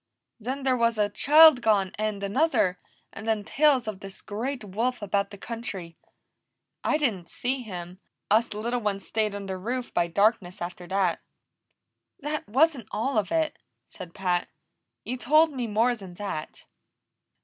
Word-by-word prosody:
"Then 260 +5 -4
there 260 -1 +3
was 230 -2 +2
a 210 -1 +2
child 305 0 +7
gone, 205 -5 +2
and 210 -1 -3
another, 200 - +2 0.3
and 220 - -8
then 220 -2 +1
tales 275 0 +3
of 210 -3 -4
this 195 -1 -11
great 240 +5 -4
wolf 225 +6 -1
about 200 -1 0
the 200 - -10
country. 195 -7 -6 0.9
I 305 - +2
didn't 215 - -1
see 255 +1 -2
him; 180 -4 -8 0.3
us 225 +2 +4
little 235 +3 -1
ones 205 -3 -2
stayed 215 -2 -1
under 195 -2 -5
roof 245 +5 -4
by 175 -1 +2
darkness 195 0 +1
after 175 0 -6
that." 190 -2 +1 1.0
"That 295 -6 -4
wasn't 270 -1 +3
all 225 +2 0
of 200 - -3
it," 320 -1 0 0.3
said 175 -2 -11
Pat. 180 -2 0 0.5
"You 255 - -4
told 305 +5 +4
me 250 -3 -3
more 225 +3 +2
than 190 -5 -11
that." 185 -6 -6
215 Hz, 155 wpm, -27 LUFS, 195-250 Hz, 1.0 s, child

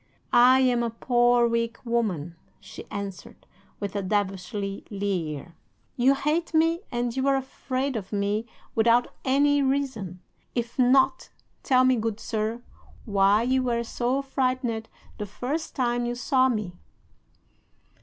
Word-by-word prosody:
"'"I 255 +2 +7
am 250 -2 +3
a 235 - 0
poor 240 +1 +3
weak 230 0 -1
woman," 195 -9 -1 0.2
she - - -11
answered, 200 -3 -7 0.3
with 200 -1 -4
a 200 - 0
devilish 195 -2 -1
leer. 195 -6 -4 0.4
"You 260 +3 +4
hate 320 +4 -1
me, 330 +2 +3
and 240 0 -2
you 265 +1 0
are 275 - +4
afraid 265 0 -3
of 195 -4 -5
me 205 +2 -1 0.3
without 230 +2 +3
any 285 +2 +3
reason. 265 -10 -1 0.4
If 235 +1 -3
not, 255 +1 +3 0.3
tell 255 -1 +4
me, 255 -1 +4
good 225 -1 -2
sir, 220 +2 -3 0.4
why 200 +1 +3
you 260 +2 +2
were 235 -2 0
so 250 +4 -1
frightened 255 -4 -1 0.3
the 210 - -4
first 265 +10 -4
time 240 -1 0
you 240 - -2
saw 260 +1 +2
me." 210 -7 -2
240 Hz, 135 wpm, -26 LUFS, 210-260 Hz, 0.4 s, I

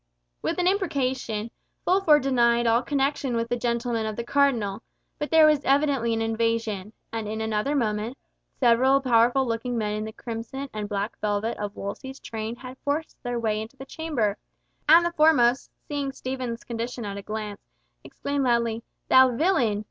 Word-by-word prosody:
With - - -1
an 360 - +1
imprecation, 260 - -1 0.3
Fulford 350 -6 +4
denied 240 -3 +3
all 230 +1 +4
connection 275 -1 0
with 230 0 -2
gentlemen 235 -1 -1
of 215 - -4
the 235 - -3
Cardinal; 235 -6 +1 0.4
but 295 - -2
there 320 -1 +7
was 300 -2 +4
evidently 275 -4 +2
an 225 0 0
invasion, 225 -3 -1 0.2
and 225 -2 -3
in 220 +1 -4
another 220 +6 -1
moment, 225 0 -1 0.4
several 260 +2 +4
powerful 245 0 +3
looking 235 +1 -2
men 210 -2 -1
in 215 0 -2
the 220 - -5
crimson 235 +5 -6
and 210 -1 -4
black 205 +1 -3
velvet 210 +2 -1
of 205 0 -4
Wolsey's 265 +7 -6
train 220 +1 -5
had 255 +1 -10
forced 300 +2 -3
their 245 -1 -2
way 215 -2 0
into 225 +5 -9
the 270 - -9
chamber, 265 -9 -2 0.5
and 335 +2 +8
the 345 - 0
foremost, 290 -6 +4 0.2
seeing 285 -2 -2
Stephen's 255 -3 -5
condition 235 0 -4
at 200 -1 -5
a - - -5
glance, 210 0 -5 0.4
exclaimed 280 -1 -3
loudly, 235 -2 +1 0.3
"Thou 260 -2 +6
villain! 245 - +2
235 Hz, 165 wpm, -25 LUFS, 220-275 Hz, 0.5 s, and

